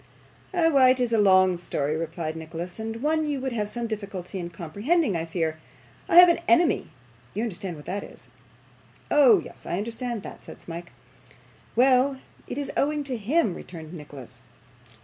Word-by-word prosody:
'Why, 325 -8 +4
it 255 0 +3
is 245 -2 0
a 225 - +4
long 185 -2 +5
story,' 150 -3 -2
replied 160 0 -4
Nicholas, 165 +4 -6
'and 225 +2 -5
one 310 0 +1
you 290 -2 -1
would 265 0 -3
have 210 -3 -2
some 240 +1 -3
difficulty 200 -4 -5
in 170 -1 -5
comprehending, 200 - 0
I 165 0 -2
fear. 160 -2 -2 0.5
I - - +2
have 355 +1 +11
an 340 - +3
enemy 345 -2 +3 0.5
you 215 - -1
understand 190 -5 -4
what 150 - -12
that 200 +2 -3
is?' - - -13 0.8
'Oh, 255 -9 +6
yes, - - -11
I 175 - -1
understand 230 +1 -3
that,' - - -10
said - - -11
Smike. 170 0 -8 0.8
'Well, 260 +2 +4 0.3
it - - -5
is 285 -1 -2
owing 295 +1 +1
to 270 -3 -3
him,' 235 - +1
returned 160 -2 -10
Nicholas. 140 -6 -11
210 Hz, 170 wpm, -25 LUFS, 170-265 Hz, 0.8 s, have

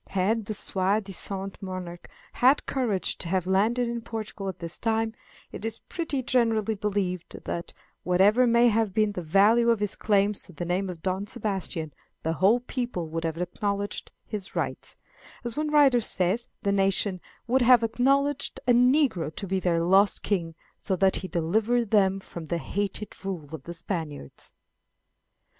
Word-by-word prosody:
Had 205 +4 0
the 215 - -3
soi 195 +2 +2
disant 195 -1 -6
monarch 185 -2 -7 0.2
had 260 +4 +4
courage 230 -8 -1
to - - -3
have 185 0 0
landed 220 +6 +2
in 235 0 -3
Portugal 215 -3 -5
at 190 - -6
this 170 -1 -6
time, 225 -1 0 0.4
it - - -8
is 225 0 -1
pretty 315 -6 -3
generally 230 -4 +2
believed 195 -4 -2
that, 170 - -4 0.3
whatever 205 +7 +4
may 235 +1 +5
have 220 -3 0
been 215 -1 +3
the 185 - -5
value 205 +8 +4
of 230 -2 +3
his 210 0 -1
claims 205 -1 +1
to 180 - -10
the 170 +3 -5
name 185 +2 -1
of 170 -3 -8
Don 190 +2 -1
Sebastian, 190 - -3 0.3
the 160 - 0
whole 195 +9 +3
people 240 -10 -4
would 165 +1 -3
have 165 -1 -2
acknowledged 200 +3 -3
his 200 -3 -6
rights; - - -3 0.5
as 235 -2 -3
one 305 0 -1
writer 280 -5 +5
says, 200 +3 0 0.2
the 200 - +2
nation 195 -1 +1 0.2
"would 260 +3 +2
have 245 -1 +6
acknowledged 275 +5 +1
a 245 - +6
negro 250 - +3
to 200 - -5
be 190 0 0
their 170 -2 +1
lost 195 +4 +4
king, 170 -5 -1 0.2
so 190 - -1
that 190 +1 +3
he 185 - -5
delivered 215 +7 0
them 195 -2 +3
from 170 -4 -9
the 170 - -1
hated 205 +3 -4
rule 170 -6 -5
of 150 -4 -7
the 170 - -6
Spaniards." 160 - -5
200 Hz, 170 wpm, -27 LUFS, 185-230 Hz, 0.5 s, have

